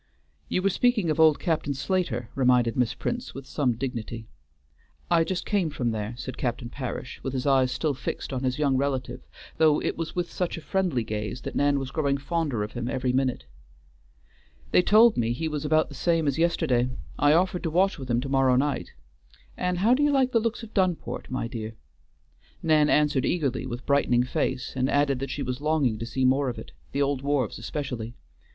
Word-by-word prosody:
"You 185 - 0
were 195 - +3
speaking 215 -5 +2
of 155 - -2
old 155 -2 +6
Captain 155 -4 -1
Slater," 135 - -1
reminded 125 -3 +3
Miss 125 -2 +1
Prince 240 +1 -4
with 135 0 -7
some 135 -3 0
dignity. 115 -2 -5 0.9
"I 170 -1 +5
just 180 +2 -3
came 195 -6 +1
from 125 -5 -1
there," 110 +1 -4
said 130 - -7
Captain 120 -1 -2
Parish, 125 -1 -6
with 135 - -4
his 130 0 -2
eyes 135 -2 +3
still 150 +3 0
fixed 135 - -5
on 130 - -2
his 130 -1 -1
young 140 -3 +2
relative, 130 -2 -2 0.4
though 155 -2 +4
it - - -2
was 165 - -4
with 175 -1 -2
such 180 -2 -2
a - - -7
friendly 180 - 0
gaze 105 +2 -4
that - - -6
Nan 145 0 +2
was 135 -1 -4
growing 140 -3 0
fonder 140 -5 -1
of 105 - -5
him 120 0 -4
every 125 -1 -1
minute. 130 - 0 1.3
"They - - +6
told 215 +5 +6
me 115 0 +1
he 160 +7 -3
was 150 -1 -3
about 155 +1 +3
the - - -10
same 165 +3 +1
as 140 +2 0
yesterday. 145 -7 +2 0.3
I 145 +1 +5
offered 180 +2 +2
to 165 - -1
watch 185 +2 +2
with 130 -2 -7
him 120 0 +2
to 135 - -5
morrow 135 -2 +3
night. 140 +3 -1 0.6
And 180 0 -1
how 215 +7 +4
do 265 - +2
you 290 0 +4
like 265 -2 +2
the 230 - +3
looks 230 +1 -2
of 225 - -10
Dunport, 185 -4 -1
my 130 -2 -2
dear?" 110 -2 -6 0.9
Nan 155 -2 +4
answered 150 -3 +3
eagerly 135 -6 -1
with 120 -1 -6
brightening 135 -4 +3
face, 125 0 -2
and 130 0 +1
added 140 -2 +2
that 135 0 -4
she 140 +1 -3
was 125 +1 -4
longing 150 -8 +1
to 115 - -4
see 130 +2 0
more 135 +1 +3
of 120 - -5
it; - - -9 0.2
the 140 - +1
old 140 -1 -1
wharves 140 -6 -1
especially. 120 -2 -5
140 Hz, 205 wpm, -26 LUFS, 125-160 Hz, 1.3 s, old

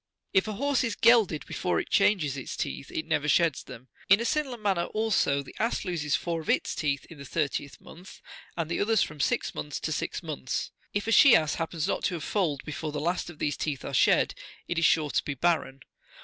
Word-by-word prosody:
If 190 +2 +3
a 215 - -3
horse 280 +5 +1
is 230 -4 -1
gelded43 225 -10 +4
before 180 - -1
it - - -5
changes 175 -9 +3
its 135 - -6
teeth, - - -4
it - - -4
never - - 0
sheds - - +3
them. 125 +3 -12 0.2
In 195 +2 +7
a 235 - -2
similar 290 -3 -1
manner, 195 -5 0
also, 205 -10 +1
the - - -13
ass 230 +2 -1
loses 155 -5 -1
four 170 -2 -2
of 155 - -10
its - - +1
teeth 140 -2 -1
in 160 - -11
the - - -8
thirtieth 140 -1 -3
month, 180 +3 -13 0.4
and 165 -2 -1
the 170 - -2
others 220 +1 +3
from 150 - -7
six - - 0
months 75 0 -5
to - - -2
six - - -3
months. 65 - -4 0.2
If 205 - -2
a 225 - -1
she 260 +2 +8
ass 155 -1 +2
hap 165 - -1
pens 165 0 -2
not - - -1
to 180 - 0
have 160 - -6
foaled 160 -10 -1
before 155 0 -4
the 145 - -3
last 175 +4 -1
of 165 - -11
these 145 -2 -1
teeth 145 -4 -3
are - - -5
shed, - - +3 0.3
it 175 - -1
is 165 - +3
sure 150 -2 +3
to - - +1
be 140 - -4
barren. 140 -3 0
170 Hz, 235 wpm, -28 LUFS, 150-205 Hz, 0.4 s, she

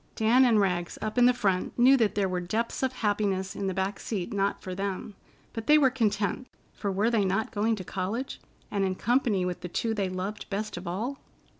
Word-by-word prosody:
Dan 235 +4 +5
and 230 -3 +4
Rags, 180 -3 0
up 215 +3 -2
in 245 0 +7
front, 195 -7 -1
knew 255 +3 +7
that 215 -5 +1
there 200 -2 +2
were 185 -1 -1
depths 220 +7 -2
of 260 -1 +1
happiness 205 -5 -1
in 200 - -2
the 190 - -1
back 190 +1 -1
seat 210 0 -4
not 200 0 0
for 185 - -6
them, 195 +2 -4 0.4
but 225 -2 -6
they 300 - +7
were 270 -4 +4
content, 220 -1 0 0.3
for 200 - -3
were 205 +5 +1
they 220 -3 +3
not 195 +3 0
going 220 +2 +1
to 195 - -7
college, 195 +9 -4 0.3
and 200 -2 0
in 190 -1 0
company 230 -5 +1
with 180 -1 -3
the 180 - -5
two 225 +5 -1
they 200 -3 -1
loved 185 +3 -5
best 210 +2 -3
of 175 +1 -7
all? 230 +10 -3
205 Hz, 215 wpm, -28 LUFS, 190-230 Hz, 0.4 s, in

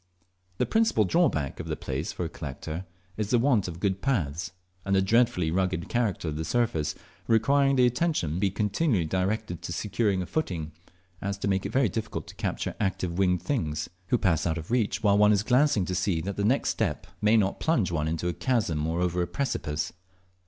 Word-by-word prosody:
The - - +2
principal 220 - +3
drawback 95 - +1
of - - -5
the - - -2
place 70 +5 -4
for 90 - -4
a - - -4
collector 80 +4 -6 0.3
is 105 -2 -2
the 120 - +4
want 120 -5 +2
of 85 -1 -6
good 95 0 0
paths, 95 - -1 0.3
and 100 0 +1
the 95 - +4
dreadfully 95 -6 +2
rugged 90 -1 -1
character 110 -9 0
of 75 - -4
the 80 - -2
surface, 80 -7 0 0.3
requiring 135 +5 +3
the 125 -1 +5
attention 125 - +1
to 85 - -2
be 100 0 +2
so 95 - -14
continually 105 - +1
directed 95 +1 -1
to - - -6
securing 100 +1 0
a - - -6
footing, 85 - -3 0.5
as 100 0 -2
to 100 - -3
make 95 -1 +1
it - - -8
very 130 -2 +3
difficult 110 +2 -4
to - - -11
capture - - -2
active 95 -3 -1
winged 90 -3 +2
things, 80 - -2 0.2
who 125 - +3
pass 85 -7 +1
out 80 0 0
of 80 +5 -7
reach 115 -3 0
while 100 -1 +4
one 105 0 +6
is 105 -1 +3
glancing 125 -5 +3
to 90 - -3
see 90 -2 0
that 95 +4 -4
the 100 - -1
next 125 +7 +2
step - - -2 0.2
may 105 +2 +5
not 100 -2 +1
plunge 120 - +1
one 80 -2 0
into 80 +2 -2
a 90 - 0
chasm 85 - 0
or 85 +2 -1
over 90 0 0
a 85 - 0
precipice. 75 - -2
95 Hz, 210 wpm, -27 LUFS, 85-115 Hz, 0.5 s, one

